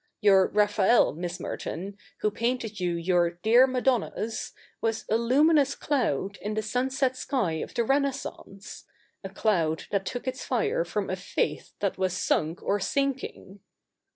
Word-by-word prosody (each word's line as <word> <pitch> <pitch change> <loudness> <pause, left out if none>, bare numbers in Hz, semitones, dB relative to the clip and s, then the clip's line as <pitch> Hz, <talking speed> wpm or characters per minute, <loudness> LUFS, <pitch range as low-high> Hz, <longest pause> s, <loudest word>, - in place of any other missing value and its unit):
Your 195 -2 +5
Raphael, 210 +2 +3
Miss 175 +2 -5
Merton, 195 +4 -5 0.3
who 210 - +1
painted 230 -2 -2
you 175 -2 0
your 175 0 +2
" 175 - -39
dear 240 +4 +6
Madonnas," 250 -3 -1 0.3
was 225 -1 -1
a - - +4
luminous 275 +4 +3
cloud 200 - -1
in 210 +1 -3
the 215 - -1
sunset 260 +3 0
sky 220 - -1
of - - -7
the 235 - +2
Renaissance, 270 -6 -3 0.2
— - - -40
a 195 - -5
cloud 175 -6 0
that 195 -2 -1
took 245 +1 -5
its 260 0 -3
fire - - 0
from - - -3
a - - 0
faith - - -3
that 200 -2 -1
was 185 -2 +1
sunk 165 -3 0
or 205 - +1
sinking.' 265 -5 -2
215 Hz, 155 wpm, -27 LUFS, 190-255 Hz, 0.3 s, dear